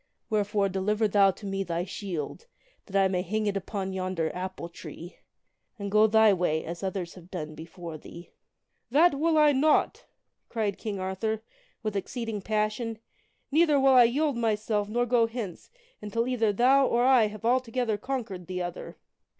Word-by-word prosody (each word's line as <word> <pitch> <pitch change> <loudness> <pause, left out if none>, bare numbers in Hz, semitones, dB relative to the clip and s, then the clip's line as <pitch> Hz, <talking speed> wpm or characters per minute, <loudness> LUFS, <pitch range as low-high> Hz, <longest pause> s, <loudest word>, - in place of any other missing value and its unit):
Wherefore 205 -1 +1
deliver 210 +3 0
thou 200 -1 +5
to 195 +2 -6
me 195 0 -2
thy 170 -1 -2
shield, 190 - -5 0.4
that 195 - -9
I 195 - +4
may 185 -1 0
hang 215 +4 -2
it 205 -1 0
upon 195 0 -3
yonder 185 -3 -2
apple 185 -1 -5
tree, 170 0 -10 0.6
and 200 -1 -5
go 215 +1 +5
thy 220 -1 +5
way 165 -4 0
as 170 +1 -6
others 190 -3 -3
have 180 -1 -14
done 155 -5 -5
before 165 0 -9
thee. 170 +3 -12 0.2
" - - -55
" - - -49
That 310 +7 +5
will 315 +3 +1
I 300 -1 +6
not! 290 +3 +2 0.2
" - - -53
cried 215 -4 -2
King 205 -3 -4
Arthur, 210 +4 -2 0.4
with 215 -2 -2
exceeding 225 +1 -3
passion, 215 +2 -1 0.5
"neither 305 -1 +4
will 270 0 +5
I 250 -2 +8
yield 280 +2 +1
myself 215 -2 0
nor 240 +3 +1
go 235 -1 +3
hence 225 -6 -6 0.3
until 230 +3 -2
either 230 -4 +1
thou 260 +6 +4
or 240 +1 +2
I 255 -4 +5
have 215 +1 -9
altogether 245 -2 +1
conquered 215 -8 -5
the 185 0 -4
other." 175 -1 -6
210 Hz, 175 wpm, -27 LUFS, 185-235 Hz, 0.6 s, I